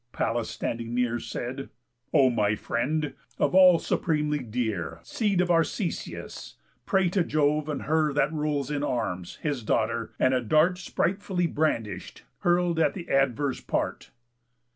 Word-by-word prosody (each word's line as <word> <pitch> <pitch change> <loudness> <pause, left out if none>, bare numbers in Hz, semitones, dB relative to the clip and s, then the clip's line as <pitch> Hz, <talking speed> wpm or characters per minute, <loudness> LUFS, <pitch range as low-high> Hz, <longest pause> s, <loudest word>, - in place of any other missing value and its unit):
Pallas, 115 0 -1
standing 115 0 -4
near, 120 -1 +1
Said: 130 +4 -5 0.4
"O 130 -2 +5
my 105 -3 +1
friend! 140 +7 -1 0.2
Of - - +1
all 185 -2 +8
supremely 150 -3 0
dear, 110 - -3
Seed 205 -5 0
of 180 -1 +1
Arcesius, 170 +2 -2 0.3
pray 190 -3 +3
to 180 0 +1
Jove 150 -1 +1
and 145 - -3
Her 155 0 +2
That 145 +2 +1
rules 150 -2 -1
in 145 -1 -1
arms, 95 -10 -2
his 145 -5 -1
daughter, 110 - 0
and 130 - +3
a 130 - +2
dart, 155 - +3
Spritefully 190 -1 -1
brandish'd, 115 - -2 0.2
hurl 175 -1 +2
at 160 - +2
th' 175 -3 -7
adverse 135 0 +1
part." - - -2
145 Hz, 140 wpm, -27 LUFS, 120-165 Hz, 0.4 s, all